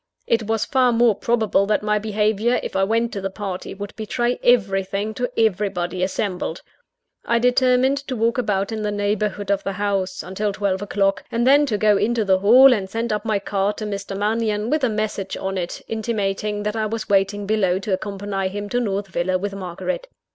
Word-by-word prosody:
It 225 -2 0
was 225 -1 0
far 255 -2 +3
more 235 -1 +4
probable 215 -2 +1
that 210 0 +1
my 210 0 +1
behaviour, 215 +2 +1
if - - -6
I 190 - +2
went 230 +3 0
to 200 - -4
the 195 - -2
party, 195 -2 -6
would 205 +1 -7
betray 240 +3 -1
everything 200 -2 +1
to 245 +2 -2
everybody 190 -4 0
assembled. 185 -2 -2 0.6
I 235 - +1
determined 250 +2 +3
to 260 - -3
walk 230 +2 +1
about 200 -4 0
in 220 -1 -3
the 210 - -1
neighbourhood 205 0 -1
of 200 - 0
the 195 - -2
house, 195 -1 -2
until 200 +3 -2
twelve 195 -1 -1
o'clock; 195 -1 0
and 235 +1 0
then 285 +2 +5
to 215 -5 0
go 210 -1 +4
into 225 0 +1
the 190 -1 +3
hall, 250 +7 +7
and 195 -5 -2
send 225 +1 -2
up 210 +1 -3
my 215 -2 +1
card 200 +1 -1
to 215 - -4
Mr. 200 -1 -4
Mannion, 215 +1 0
with 305 -2 +1
a 255 - +3
message 210 -3 -3
on 190 0 -3
it, 180 -2 -4
intimating 210 -2 -2
that 210 +1 -2
I 220 -1 0
was 220 0 -4
waiting 200 +1 +1
below 195 -4 +1
to 195 +1 -3
accompany 195 0 -3
him 205 +2 -5
to 245 - 0
North 200 -4 -1
Villa 185 0 -1
with 200 +2 -4
Margaret. 195 - -4
210 Hz, 200 wpm, -22 LUFS, 195-225 Hz, 0.6 s, hall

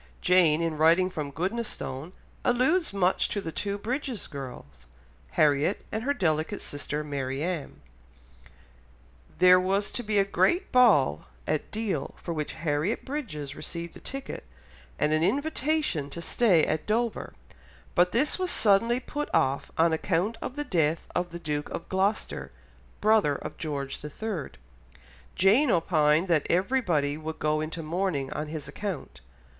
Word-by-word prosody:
Jane 170 -3 +4
in 165 -2 -1
writing 170 +4 +4
from 150 -5 -4
Goodnestone 180 - -4 0.3
alludes 265 - +2
much 190 -2 +1
to 205 - -2
the 165 -5 -5
two 200 +5 -3
Bridges 250 +1 -3
girls, 125 - -9 0.5
Harriet 150 +4 +2
and 220 - -2
her 285 +3 +1
delicate 160 - 0
sister 150 +1 -4
Marianne. 145 +3 -3 1.6
There 180 0 +7
was 195 +2 +1
to - - -3
be 215 -2 -1
a 200 - +4
great 345 - +1
ball 200 - +4 0.2
at 155 - -1
Deal 210 -10 -3
for 170 - -5
which 150 -2 -3
Harriet 155 +5 -1
Bridges 185 - -5
received 170 0 -6
a - - -10
ticket, 275 0 -6 0.5
and 150 +1 +2
an 155 - +2
invitation 285 - 0
to 170 - -7
stay 175 -2 +3
at 155 0 -2
Dover, 230 +1 -1 0.6
but 180 0 +4
this 295 +9 +2
was 370 -1 0
suddenly 230 - +4
put 295 +3 -4
off 135 +1 +1
on 165 0 +4
account 180 +6 0
of 255 - -5
the 295 - -2
death 160 - +1
of 175 0 -1
the 170 - -7
Duke 150 -3 -3
of - - -6
Gloucester, 195 +3 -1 0.5
brother 210 -9 +4
of - - -7
George 140 -4 -4
III. 165 +1 -4 0.9
Jane 220 +10 +4
opined 160 -2 +3
that 165 -5 +2
everybody 175 - +1
would 160 0 -5
go 155 0 0
into 160 +2 -4
mourning 160 -4 -1
on 150 - -3
his 150 -2 -6
account. 150 - -6
175 Hz, 145 wpm, -27 LUFS, 150-215 Hz, 1.6 s, There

